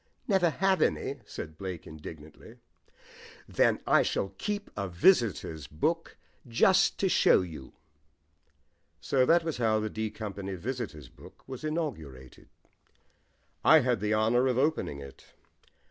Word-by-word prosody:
"Never 190 Hz, -5 st, +3 dB
have 190 Hz, +4 st, +1 dB
any!" 140 Hz, +1 st, 0 dB
said 80 Hz, -1 st, -8 dB
Blake 95 Hz, -4 st, -6 dB
indignantly. 80 Hz, 0 st, -11 dB, 0.9 s
"Then -, -, +2 dB
I -, -, +5 dB
shall 95 Hz, -, -1 dB
keep 205 Hz, -1 st, -3 dB
a 100 Hz, -1 st, -3 dB
visitors' 90 Hz, -, +2 dB
book 165 Hz, -, -2 dB, 0.3 s
just 150 Hz, +11 st, +3 dB
to 195 Hz, -, +3 dB
show 180 Hz, -, +4 dB
you." 80 Hz, -7 st, -9 dB, 1.3 s
So 130 Hz, -2 st, +1 dB
that 170 Hz, +1 st, +4 dB
was 160 Hz, -4 st, -3 dB
how 110 Hz, -2 st, +2 dB
the 110 Hz, 0 st, -3 dB
D 110 Hz, 0 st, -3 dB
Company 100 Hz, -3 st, -6 dB
Visitors' 105 Hz, -, -5 dB
Book -, -, -17 dB
was 130 Hz, 0 st, -8 dB
inaugurated. 90 Hz, -, -5 dB, 1.1 s
I 160 Hz, 0 st, +7 dB
had 125 Hz, -3 st, +1 dB
the 105 Hz, +2 st, 0 dB
honour 120 Hz, +4 st, +2 dB
of 125 Hz, -2 st, 0 dB
opening 140 Hz, -, 0 dB
it. 70 Hz, -1 st, -14 dB
110 Hz, 130 wpm, -29 LUFS, -, 1.3 s, I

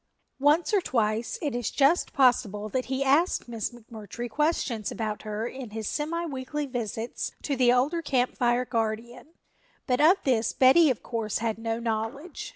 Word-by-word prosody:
Once 300 Hz, +8 st, +3 dB
or 400 Hz, -, +4 dB
twice 225 Hz, -5 st, -1 dB
it 290 Hz, -4 st, -1 dB
is 245 Hz, -1 st, -1 dB
just 290 Hz, +5 st, +2 dB
possible 230 Hz, -6 st, +2 dB
that 255 Hz, +3 st, -2 dB
he 265 Hz, +1 st, -1 dB
asked 290 Hz, +5 st, +2 dB
Miss 230 Hz, -3 st, -3 dB
McMurtry 230 Hz, -1 st, -8 dB
questions 250 Hz, -5 st, -1 dB
about 215 Hz, -2 st, -3 dB
her 215 Hz, +1 st, -4 dB
in 255 Hz, -1 st, -6 dB
his 220 Hz, 0 st, -5 dB
semi 335 Hz, +3 st, -2 dB
weekly 290 Hz, 0 st, -4 dB
visits 235 Hz, -3 st, -4 dB
to 285 Hz, -, -1 dB
the 250 Hz, -2 st, +4 dB
older 280 Hz, +7 st, +2 dB
Camp 255 Hz, -5 st, 0 dB
Fire 245 Hz, 0 st, +1 dB
guardian, 230 Hz, +6 st, -3 dB, 0.5 s
but 250 Hz, +1 st, +1 dB
of 340 Hz, +6 st, +6 dB
this 235 Hz, -4 st, +1 dB
Betty 275 Hz, +5 st, +6 dB
of 250 Hz, -, -2 dB
course 225 Hz, -3 st, -2 dB
had 225 Hz, -1 st, -2 dB
no 225 Hz, 0 st, -2 dB
knowledge. 235 Hz, +8 st, -4 dB
245 Hz, 165 wpm, -27 LUFS, 225-285 Hz, 0.5 s, of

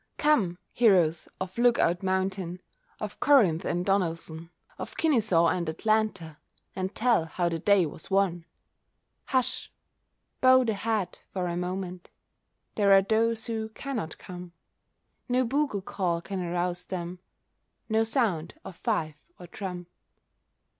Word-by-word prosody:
Come, 225 Hz, -, +2 dB, 0.2 s
heroes 180 Hz, -9 st, +3 dB
of 185 Hz, +4 st, -5 dB
Look 240 Hz, 0 st, +5 dB
Out 175 Hz, +1 st, +2 dB
Mountain, 190 Hz, -1 st, -1 dB, 0.4 s
Of -, -, -6 dB
Corinth 210 Hz, -, +4 dB
and 175 Hz, +1 st, -1 dB
Donelson, 165 Hz, -4 st, -1 dB, 0.3 s
Of -, -, -7 dB
Kenesaw 215 Hz, -, +3 dB
and 170 Hz, -3 st, -2 dB
Atlanta, 195 Hz, -4 st, 0 dB, 0.4 s
And 190 Hz, +1 st, -3 dB
tell 230 Hz, -7 st, +3 dB
how 170 Hz, +2 st, -1 dB
the 165 Hz, -1 st, -3 dB
day 200 Hz, 0 st, +4 dB
was 155 Hz, +1 st, -7 dB
won! 190 Hz, -4 st, +1 dB, 0.8 s
Hush! 255 Hz, -2 st, -1 dB, 0.7 s
bow 260 Hz, 0 st, +7 dB
the 225 Hz, -3 st, 0 dB
head 210 Hz, -3 st, -2 dB
for 185 Hz, -2 st, -1 dB
a 170 Hz, -1 st, -2 dB
moment— 180 Hz, 0 st, -4 dB, 0.6 s
There 200 Hz, -2 st, +3 dB
are 195 Hz, 0 st, +7 dB
those 225 Hz, +2 st, +1 dB
who 220 Hz, -1 st, -2 dB
cannot 220 Hz, -, -5 dB
come. 180 Hz, -1 st, -9 dB, 0.8 s
No 250 Hz, +1 st, +2 dB
bugle 265 Hz, -5 st, 0 dB
call 175 Hz, -4 st, -1 dB
can 190 Hz, +2 st, -5 dB
arouse 175 Hz, 0 st, -2 dB
them— 180 Hz, -1 st, -5 dB, 0.7 s
No 220 Hz, 0 st, +2 dB
sound 220 Hz, -, 0 dB
of 185 Hz, -, -9 dB
fife 155 Hz, -2 st, -1 dB, 0.2 s
or 180 Hz, -, -9 dB
drum. 180 Hz, 0 st, -6 dB
190 Hz, 135 wpm, -28 LUFS, 175-220 Hz, 0.8 s, bow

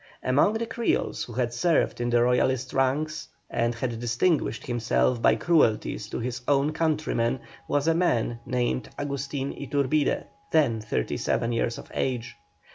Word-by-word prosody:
Among 140 Hz, +11 st, +3 dB
the 225 Hz, +1 st, -1 dB
Creoles 230 Hz, +1 st, -1 dB
who 120 Hz, -, -10 dB
had 120 Hz, 0 st, -1 dB
served 155 Hz, -1 st, +1 dB
in 120 Hz, -, 0 dB
the 120 Hz, 0 st, +4 dB
Royalist 125 Hz, +1 st, +1 dB
ranks, 145 Hz, +4 st, 0 dB, 0.2 s
and 115 Hz, 0 st, 0 dB
had 115 Hz, -1 st, -3 dB
distinguished 120 Hz, +8 st, 0 dB
himself 120 Hz, 0 st, +1 dB
by 110 Hz, -, +5 dB
cruelties 110 Hz, -7 st, +2 dB
to -, -, -4 dB
his 125 Hz, +1 st, -3 dB
own 145 Hz, +1 st, +3 dB
countrymen, 150 Hz, -6 st, 0 dB, 0.3 s
was 145 Hz, +1 st, 0 dB
a 165 Hz, -, +5 dB
man 125 Hz, -9 st, +1 dB
named 125 Hz, 0 st, -1 dB
Agustin 140 Hz, -1 st, -3 dB
Iturbide, 140 Hz, +1 st, 0 dB, 0.3 s
then 130 Hz, -9 st, +3 dB
thirty 105 Hz, -, -2 dB
seven 115 Hz, -, 0 dB
years 115 Hz, 0 st, 0 dB
of -, -, -11 dB
age. 125 Hz, -2 st, -2 dB
130 Hz, 150 wpm, -26 LUFS, 120-150 Hz, 0.3 s, by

